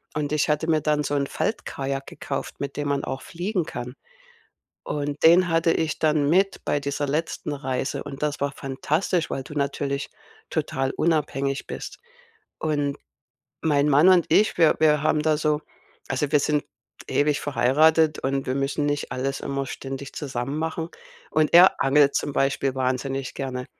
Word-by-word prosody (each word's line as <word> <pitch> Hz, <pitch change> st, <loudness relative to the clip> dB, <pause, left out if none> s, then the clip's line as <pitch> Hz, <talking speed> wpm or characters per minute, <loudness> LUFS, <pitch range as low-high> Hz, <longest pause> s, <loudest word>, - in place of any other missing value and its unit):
Und 150 Hz, -1 st, -2 dB
ich 155 Hz, -2 st, +1 dB
hatte 150 Hz, +2 st, +1 dB
mir 155 Hz, -2 st, +3 dB
dann 150 Hz, 0 st, +1 dB
so 145 Hz, -, -1 dB
'n 140 Hz, -, +1 dB
Faltkajak 135 Hz, -10 st, -3 dB
gekauft, -, -, -5 dB
mit 140 Hz, 0 st, -5 dB
dem 145 Hz, -1 st, -2 dB
man 140 Hz, -1 st, 0 dB
auch 135 Hz, -, -4 dB
fliegen 180 Hz, 0 st, -2 dB
kann. 125 Hz, -4 st, -6 dB, 0.9 s
Und 145 Hz, 0 st, -3 dB
den 175 Hz, +3 st, +7 dB
hatte 165 Hz, 0 st, +3 dB
ich 160 Hz, -1 st, -1 dB
dann 150 Hz, -2 st, +2 dB
mit 195 Hz, +3 st, +2 dB
bei 145 Hz, -, +1 dB
dieser 140 Hz, +1 st, -2 dB
letzten 150 Hz, 0 st, -2 dB
Reise. 135 Hz, 0 st, -3 dB
Und 140 Hz, -1 st, -8 dB
das 150 Hz, -1 st, -1 dB
war 140 Hz, 0 st, 0 dB
fantastisch, 155 Hz, +6 st, -1 dB
weil 135 Hz, -, -3 dB
du 150 Hz, -, -10 dB
natürlich 140 Hz, -1 st, -2 dB, 0.4 s
total 135 Hz, 0 st, -1 dB
unabhängig 140 Hz, -4 st, 0 dB
bist. -, -, -7 dB, 0.6 s
Und 145 Hz, -2 st, -1 dB, 0.7 s
mein 150 Hz, -2 st, +2 dB
Mann 145 Hz, +5 st, +6 dB
und 180 Hz, -3 st, +5 dB
ich, 215 Hz, +2 st, +4 dB
wir 165 Hz, -3 st, +5 dB
wir 150 Hz, -2 st, +4 dB
haben 155 Hz, -1 st, +2 dB
da 155 Hz, 0 st, +2 dB
so 150 Hz, -1 st, +1 dB, 0.5 s
also, 135 Hz, +2 st, -1 dB
wir 150 Hz, -, +5 dB
sind 150 Hz, 0 st, 0 dB, 0.4 s
ewig 145 Hz, 0 st, +1 dB
verheiratet 155 Hz, +3 st, +3 dB
und 135 Hz, 0 st, -1 dB
wir 130 Hz, -, -1 dB
müssen 140 Hz, +2 st, -1 dB
nicht 145 Hz, 0 st, -2 dB
alles 135 Hz, +2 st, -2 dB
immer 140 Hz, -1 st, -3 dB
ständig 135 Hz, +1 st, -7 dB
zusammen 135 Hz, 0 st, -4 dB
machen. 160 Hz, +1 st, -3 dB, 0.4 s
Und 155 Hz, -1 st, +2 dB
er 180 Hz, +2 st, +7 dB
angelt 140 Hz, +1 st, +4 dB
zum 145 Hz, -, -1 dB
Beispiel 135 Hz, -1 st, 0 dB
wahnsinnig 130 Hz, +1 st, -2 dB
gerne 130 Hz, -2 st, -4 dB
145 Hz, 165 wpm, -24 LUFS, 135-155 Hz, 0.9 s, den